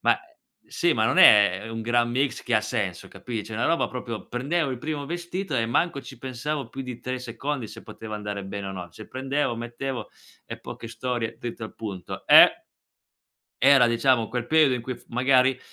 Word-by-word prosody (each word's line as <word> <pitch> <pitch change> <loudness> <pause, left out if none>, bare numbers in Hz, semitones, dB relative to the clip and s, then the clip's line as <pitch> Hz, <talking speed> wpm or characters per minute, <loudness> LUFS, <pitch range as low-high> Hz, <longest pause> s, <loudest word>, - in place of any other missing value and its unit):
Ma - - +4
e 380 - -21 0.4
sì, 170 -2 +1
ma 110 - +2
non 110 - +2
è 100 0 +7
un 115 0 -5
gran 120 +1 +2
mix 135 +3 0
che 125 - -1
ha 110 - +3
senso, 105 -5 -3
capi 115 -4 -6
cioè, 110 - -10
una 110 +2 0
roba 165 - +2
proprio 120 -3 -6
prendevo 140 +5 -1
il 125 - -4
primo 150 0 -4
vestito 175 +2 -4
e 115 -3 +1
manco 140 +5 0
ci - - -11
pensavo 135 +3 -4
più 135 - -7
di 125 -2 -6
3 130 0 -3
secondi 125 +2 -4
se 110 +1 -11
poteva 110 -1 -8
andare 105 -1 -5
bene 100 0 -5
o - - -5
no. 90 -2 -7
Cioè, 110 +5 -12
prendevo, 135 -1 -2
mettevo 120 +2 -5 0.4
e - - -7
poche 115 - -9
storie 115 0 -3
dritto 115 -1 -6
al 110 - -10
punto. 100 -5 -7
E - - +8 1.0
era 135 -2 +7
diciamo 120 -1 +2
quel 120 0 -3
periodo 155 -3 +4
in 125 - -4
cui 130 +2 -4
f - - -21
magari 130 +1 +3
120 Hz, 200 wpm, -25 LUFS, 115-135 Hz, 1.0 s, E